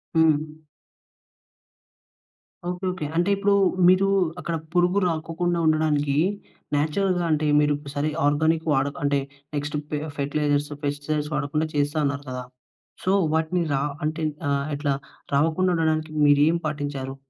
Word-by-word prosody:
హ్మ్. 155 -1 +3 2.1
Okay. 180 +1 -4
Okay. 180 -5 -5
అంటే 175 +4 +2
ఇప్పుడు 200 +1 +2 0.3
మీరు 185 +2 +5 0.3
అక్కడ 170 -1 -3 0.2
పురుగు 180 +3 +3
రాకోకుండా 170 +1 -1
ఉండడానికి 150 -2 +2 0.6
నేచురల్‌గా 175 +4 +1
అంటే 155 0 +1
మీరు 150 0 +3 0.2
సరే 145 +2 0 0.2
ఆర్గానిక్ 160 +2 +1
వాడక్ 140 +1 0
అంటే 145 0 +2 0.4
నెక్స్ట్ 145 +1 -2
పె 150 - -2 0.2
ఫెర్టిలైజర్స్ 145 0 0 0.2
పెస్టిసైడ్స్ 145 +1 -2
వాడకుండా 150 +2 -1
చేస్తా 145 +1 0
అన్నారు 140 0 -1
కదా! 125 0 -4 0.6
సో, 185 - +1 0.2
వాటిని 160 +2 +1
రా 135 - +1 0.2
అంటే 155 +1 -2 0.3
ఆహ్, 140 0 0
ఇట్లా 145 -1 0 0.4
రావకుండా 160 +6 +2
ఉండడానికి 155 -1 0
మీరు 145 0 +5
ఏం 170 - +2
పాటించారు? 145 -3 -4
155 Hz, 125 wpm, -24 LUFS, 145-165 Hz, 2.1 s, మీరు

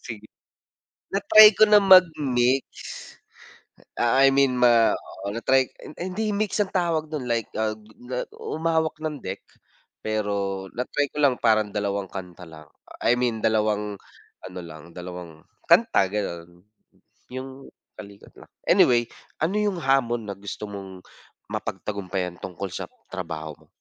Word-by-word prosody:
Sige. 110 -2 -8 0.9
Na-try 210 +2 +8
ko 215 +1 +5
na 210 -1 +6
mag-mix. 140 -9 +5 1.4
Ah, 120 +3 +3
I 135 - +7
mean 135 -2 +3
ma 120 -2 +5
oo, 100 +1 -7
na-try 130 +3 +2 0.2
ay 170 - -8
hindi 220 +2 -1
mix 210 0 -1
ang 200 - -1
tawag 165 -4 0
do'n 150 -5 -4
like 115 -2 -1
ah, 110 0 0 0.6
humawak 160 0 -1
ng 150 -2 -3
deck 95 +1 -5 0.6
pero 100 -3 -2
na-try 140 +3 -1
ko - - -10
lang, 135 -4 +3
parang 110 -2 +3
dalawang 100 -2 -2
kanta 90 -2 -8
lang. 75 -1 -13 0.4
I 120 - +5
mean, 125 -2 0
dalawang 105 -2 0 0.5
ano 90 0 -8
lang, 80 0 -12
dalawang 90 -3 -9 0.2
kanta 95 - +4
gano'n. 85 -4 -5 0.7
'Yong 130 +1 -8 0.3
kalikot 100 -1 -12
lang. - - -16 0.2
Anyway, 120 -1 +4 0.3
ano 175 +7 0
'yong 205 -4 0
hamon 120 -5 +1
na 100 - -4
gusto 100 +2 -7
mong 95 -2 -9 0.5
mapagtagumpayan 95 -3 -4
tungkol 95 +1 -6
sa - - -4 0.3
trabaho 80 -5 -5
mo? - - -41
115 Hz, 135 wpm, -24 LUFS, 95-140 Hz, 1.4 s, Na-try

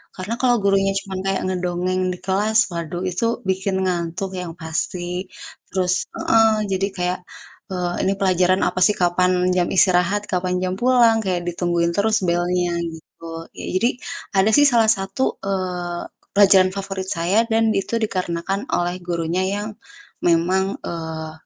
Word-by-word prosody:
Karena 190 +5 -4
kalau 245 -1 +4
gurunya 195 0 +2
cuman 190 -1 -6
kayak 195 0 0
ngedongeng 180 0 -1
di - - -8
kelas, 210 +3 +3
waduh, 170 +1 -5
itu 180 +6 -2 0.2
bikin 190 0 0
ngantuk 180 +2 -2
yang 175 -2 -5
pasti. 175 +3 -3 0.5
Terus 185 -1 +1
heeh, 225 -1 +3 0.2
jadi 195 +1 0
kayak, 180 +1 -1 0.5
eee, 180 -1 -2
ini 195 - +2
pelajaran 185 -1 +2
apa 185 - -2
sih, 210 - +6
kapan 180 +1 +3 0.2
jam 175 -1 +2
istirahat, 185 +2 +4
kapan 180 0 0
jam 185 0 -1
pulang, 240 -1 +4
kayak 180 -2 -1
ditungguin 170 -1 0
terus 215 +2 +2
belnya, 175 0 0 0.2
gitu. 165 +1 -10
Ya, - - -7
jadi 235 - +3 0.5
ada 195 +3 +4
sih 290 0 +7
salah 230 -4 +5
satu, 195 +5 -1
eee, 180 -2 -3 0.3
pelajaran 195 -2 +6
favorit 195 -1 -4
saya 190 +6 +1
dan 225 0 +3
itu 200 +3 -1
dikarenakan 190 +3 -2
oleh 175 +1 -1
gurunya 170 +1 -1
yang 205 +1 -3 0.6
memang, 185 +3 +2
eee, 160 -1 -5
185 Hz, 145 wpm, -21 LUFS, 175-195 Hz, 0.6 s, sih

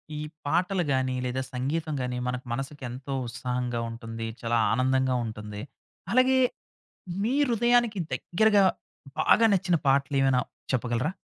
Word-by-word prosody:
ఈ - - -4 0.3
పాటలు 180 +4 +1
గాని, 130 -1 0
లేదా 125 +1 -1
సంగీతం 150 +5 -2
గాని, 125 0 -2
మనకు 125 +1 -3
మనసుకి 135 +3 -5
ఎంతో 130 +3 -6
ఉత్సాహంగా 125 0 -3
ఉంటుంది. 115 0 -6
చాలా 115 0 +1
ఆనందంగా 130 +1 +2
ఉంటుంది. 105 -1 -6 0.5
అలగే, 255 +3 +4 0.8
మీ 235 +4 +1 0.2
హృదయానికి 240 -2 +3
దెగ్గరగా, 205 +2 +3 0.6
బాగా 230 - +5
నచ్చిన 180 -2 +2
పాటలు 140 +1 +2
ఏవైనా 135 -2 +3 0.3
చెప్పగలరా? 125 +5 0
130 Hz, 125 wpm, -27 LUFS, 125-180 Hz, 0.8 s, బాగా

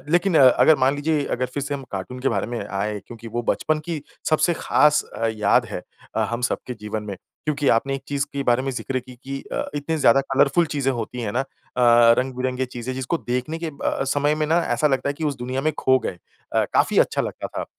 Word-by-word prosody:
लेकिन 175 -1 +3
अ, 130 -2 +9
अगर 155 +5 +5
मान 135 - +3
लीजिए 150 0 0
अगर 125 - 0
फ़िर 140 - -2
से 145 +1 -3
हम 135 -1 -6
कार्टून 100 +6 -5
के 135 - +1
बारे 100 -2 -1
में 120 -1 -4
आए 105 +2 -2
क्योंकि 115 -1 -9
वो 120 +2 -3
बचपन 155 0 0
की 165 -4 -4 0.3
सबसे 165 +2 +3
ख़ास 150 -1 +3
अ, 115 - -1
याद 105 -1 +3
है - - -6 0.3
अ, - - 0
हम 115 0 -2
सबके 125 - -4
जीवन 105 0 -4
में। 100 -2 -6 0.3
क्योंकि 145 -2 0
आपने 135 +4 0
एक 135 - -5
चीज़ 140 0 0
के 140 - -2
बारे 120 +1 +3
में 135 - -2
ज़िक्र 130 +1 -3
की 125 0 -13
कि 135 0 -4
अ, - - 0
इतनी 145 +3 -2
ज़्यादा 135 -1 +5
कलरफुल 140 +5 +4
चीज़ें 135 -2 +1
होती 120 0 -4
हैं 110 -3 -2
ना 125 - +1
अ, - - -2 0.7
रंग-बिरंगे 130 0 -1
चीज़ें 125 0 -5
जिसको 130 +6 -2
देखने 125 +6 -3
के 165 - -4
अ 155 -3 -7 0.2
अ, - - +1
समय 145 +2 +1
में 155 0 -1
ना 165 +2 +3 0.2
ऐसा 155 - +2
लगता 135 -1 +1
है 145 - +1
कि 160 - -2
उस 145 -2 0
दुनिया 130 +2 -3
में 155 0 +1
खो 130 0 +4
गए। 90 -7 -5 0.3
अ, - - +3
काफ़ी - - +3
अच्छा - - +3
लगता - - -5
था। - - -5
135 Hz, 240 wpm, -23 LUFS, 120-145 Hz, 0.7 s, अ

